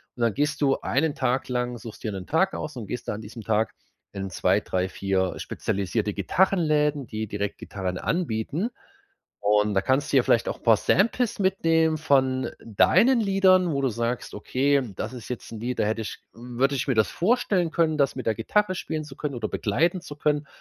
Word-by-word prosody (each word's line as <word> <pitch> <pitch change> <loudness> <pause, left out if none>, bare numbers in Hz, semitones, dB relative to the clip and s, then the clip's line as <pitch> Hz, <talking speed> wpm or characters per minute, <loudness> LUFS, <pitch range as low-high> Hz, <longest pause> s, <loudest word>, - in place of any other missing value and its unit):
Und 120 - -8
dann 115 -3 +2
gehst 150 +5 -1
du 135 -1 +3
einen 145 +3 +1
Tag 130 0 -1
lang- 125 -1 -1
suchst 115 -1 -10
dir 110 - -2
'nen 95 -2 -6
Tag 175 - +1
aus- 150 - -5
und 110 -5 -6
gehst 125 +2 -5
da - - 0
an 105 - -6
diesem 110 +1 -9
Tag 110 0 0 0.4
in 95 -1 -4
2, - - +2
3, 95 0 -1
4 95 -1 -1
spezialisierte 100 +2 -2
Gitarrenläden, 150 - +1
die 110 0 -4
direkt 100 0 -3
Gitarren 95 -2 -4
anbieten. 165 - -1 0.7
Und 105 0 +2
da 95 - +3
kannst 130 +7 +1
du 140 - +6
ja 125 - +5
vielleicht 115 - +2
auch - - -4
'n - - -28
paar 115 -2 +5
Samples 230 - +1
mitnehmen 165 -5 +2
von 130 -3 +2 0.2
deinen 230 - +4
Liedern, 190 -3 +4
wo 140 - 0
du 130 - +3
sagst: 115 +2 -3
„Okay, 135 +6 +1
das 110 +5 -4
ist 120 -2 -9
jetzt 125 - -6
'n 110 - -7
Lied, 125 +2 -3
da - - +3
hätte 110 +1 -1
ich 110 - -6
w 120 +1 -10
würde 140 +1 +3
ich 130 - -2
mir 130 - +1
das 110 - +2
vorstellen 185 -4 +1
können, 160 -2 +1
das 140 - +2
mit 130 - -5
der 110 - +3
Gitarre 185 - +1
spielen 155 -3 -4
zu 135 - -11
können 145 -2 -4
oder 110 -3 -2
begleiten 165 - 0
zu 150 -4 -9
können.“ 150 -1 0
130 Hz, 210 wpm, -25 LUFS, 110-155 Hz, 0.7 s, du